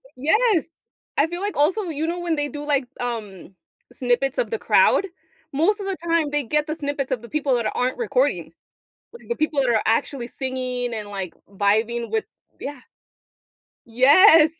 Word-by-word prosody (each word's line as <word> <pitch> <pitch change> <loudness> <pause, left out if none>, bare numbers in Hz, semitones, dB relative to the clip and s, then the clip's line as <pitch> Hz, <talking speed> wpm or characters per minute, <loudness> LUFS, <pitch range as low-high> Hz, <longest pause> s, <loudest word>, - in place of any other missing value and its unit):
Yes. 340 - +2 0.5
I 290 +3 +4
feel 345 +2 -5
like 410 -5 -3
also, 360 +9 +2
you 320 -2 -3
know, 350 +1 -2
when 340 -2 -1
they 290 0 -1
do 295 0 -7
like, 280 -3 +1
um, 210 -6 -5 0.4
snippets 255 - 0
of - - -1
the 455 - -1
crowd, 390 - +4 0.5
most 385 +9 +2
of 395 - -5
the 390 -1 -2
time 330 -3 +2
they 295 -1 0
get 300 +5 0
the 310 - -2
snippets 285 -3 -3
of 245 -3 -1
the 235 - -11
people 285 -4 +1
that 230 -3 -1
aren't 250 +1 0
recording. - - 0 0.6
Like 475 - -14
the 475 - 0
people 310 -2 0
that 255 - +1
are 220 -2 +3
actually 235 +2 0
singing 255 -2 -3
and, 210 -2 -5
like, 190 -4 -5 0.2
vibing 220 +4 0
with 445 -1 0 0.3
Yeah. 280 -3 -6 1.1
Yes. 310 - +6
285 Hz, 175 wpm, -23 LUFS, 245-330 Hz, 1.1 s, Yes